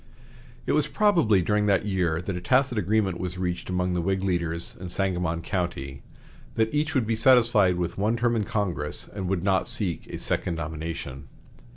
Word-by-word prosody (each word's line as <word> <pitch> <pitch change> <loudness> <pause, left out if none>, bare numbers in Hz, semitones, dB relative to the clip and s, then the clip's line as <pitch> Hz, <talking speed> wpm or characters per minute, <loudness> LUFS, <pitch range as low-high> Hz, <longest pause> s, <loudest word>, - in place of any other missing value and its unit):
It - - 0
was 150 0 +2
probably 165 - +3
during 105 +3 +1
that 100 0 +2
year 90 -4 0
that 95 0 -3
a 90 - -4
tacit 130 +3 +2
agreement 100 -2 +1
was 90 0 -4
reached 90 -1 -3
among 90 0 0
the 90 - 0
Whig 95 +2 -1
leaders 85 -3 -2
in 90 0 -6
Sangamon 90 -3 -1
County, 70 -8 -3 0.5
that 110 +2 +1
each 155 +1 0
would 130 -4 +2
be 115 +1 0
satisfied 110 -5 +5
with 90 +1 -3
one 110 +4 +1
term 120 0 +1
in 110 - +1
Congress 100 -8 -3
and 95 -3 -4
would 90 -1 -1
not 95 0 +2
seek 105 -9 0
a - - -6
second 85 - -2
nomination. 75 -3 -5
95 Hz, 185 wpm, -26 LUFS, 85-110 Hz, 0.5 s, satisfied